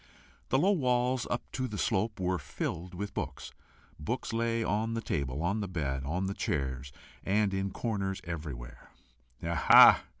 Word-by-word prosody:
The 130 - +3
low 185 +8 +4
walls, 125 -6 +1
up 120 - -1
to 130 -1 -2
the 105 -3 -6
slope, 105 +3 0
were 90 -1 0
filled 85 +4 -5
with 100 +3 -5
books; - - -5 0.5
books 115 +10 -3
lay 115 0 0
on 110 +2 -1
the - - -1
table, 70 - -2
on 100 +5 0
the 100 - -3
bed, 70 -7 -2
on 90 +6 -1
chairs, 65 -5 -3 0.3
and 100 0 +1
in 95 0 -1
corners 95 -2 -3
everywhere. 70 -7 -7 0.6
"Aha!" 85 -1 +7
95 Hz, 155 wpm, -30 LUFS, 80-115 Hz, 0.6 s, Aha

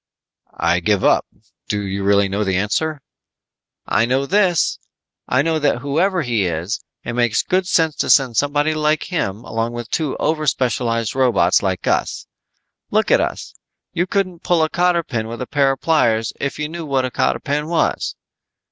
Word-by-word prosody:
"I 85 +1 +2
give 100 +2 +1
up. - - +3 0.4
Do 105 - -1
you 100 -1 -3
really 100 0 +3
know 100 +2 -1
the 95 -2 0
answer?" 140 +10 -1 0.8
"I 110 +3 +2
know 130 +2 +1
this. 185 0 +2 0.5
I 130 +2 +2
know 160 0 0
that 145 -4 +1
whoever 170 +6 +1
he 115 -6 0
is, 85 +5 -3 0.2
it 120 - -4
makes 120 -2 +1
good 185 0 0
sense 160 -4 +2
to - - -1
send 130 -4 +4
somebody 145 +3 +1
like 155 0 +1
him 105 - -2
along 115 +1 -3
with 120 -1 -7
two 155 -4 -1
overspecialized 125 -7 0
robots 125 -9 +3
like 95 -2 -2
us. - - -1 0.6
Look - - +1
at - - +5
us. - - -4 0.4
You 175 +1 0
couldn't 185 -3 -1
pull 170 -3 +2
a 155 - +1
cotter 175 -1 +2
pin 115 -7 -3
with 115 +1 -7
a - - -6
pair 135 +2 +2
of 135 - -10
pliers 115 -9 +2
if 140 - -3
you 150 - -2
knew 170 +2 -6
what 135 -2 +1
a 130 - -4
cotter - - 0
pin 150 +2 -2
was. 170 0 0
135 Hz, 180 wpm, -19 LUFS, 110-155 Hz, 0.8 s, at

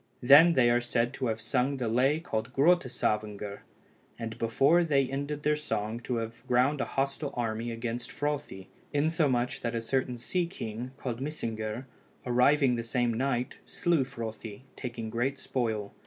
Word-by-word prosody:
Then 150 +7 +8
they 120 -5 +4
are 120 0 +3
said 120 0 0
to 130 - -2
have 110 -1 -1
sung 125 +4 0
the 125 -3 -2
lay 130 +7 +3
called 110 -7 -3
Grotta 170 +1 +4
Savngr, 105 -3 -2 0.6
and 115 -1 -5
before 135 +9 +4
they 140 -4 +3
ended 145 +2 -4
their 150 0 +3
song 115 -7 -3
to 125 +1 -3
have 115 0 -5
ground 130 +4 +3
a - - 0
hostile 140 +1 -2
army 115 0 -2
against 120 +1 -4
Frothi, 145 -10 -3 0.3
insomuch, 145 -5 +1
that 115 0 -2
a - - +1
certain 125 +1 -1
sea 170 +9 -1
king, 120 - -6
called 125 -3 -4
Mysingr, 115 -5 -4 0.4
arriving 125 +2 +4
the 115 - -2
same 120 +1 0
night, 125 +1 -1
slew 170 -5 +1
Frothi, 115 -3 -7
taking 120 -3 -5
great 125 +4 -1
spoil. 110 -6 -2
125 Hz, 160 wpm, -29 LUFS, 115-140 Hz, 0.6 s, Then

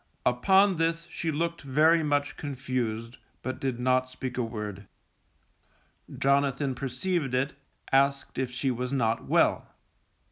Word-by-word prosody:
Upon 190 +10 +4
this 165 +1 0
she 165 -1 -2
looked 170 +2 -2
very 155 +4 +4
much 145 -2 0
confused, 125 -4 -3 0.3
but 130 - -4
did 130 -3 -2
not 130 +1 +2
speak 130 0 -5
a 125 - 0
word. 105 -4 -5 1.3
Jonathan 140 0 +2
perceived 135 +3 -2
it, 135 +3 0 0.4
asked 140 0 +2
if 130 -1 -1
she 130 +2 -1
was 125 +1 -3
not 115 -4 0
well. - - +2
135 Hz, 130 wpm, -28 LUFS, 125-150 Hz, 1.3 s, Upon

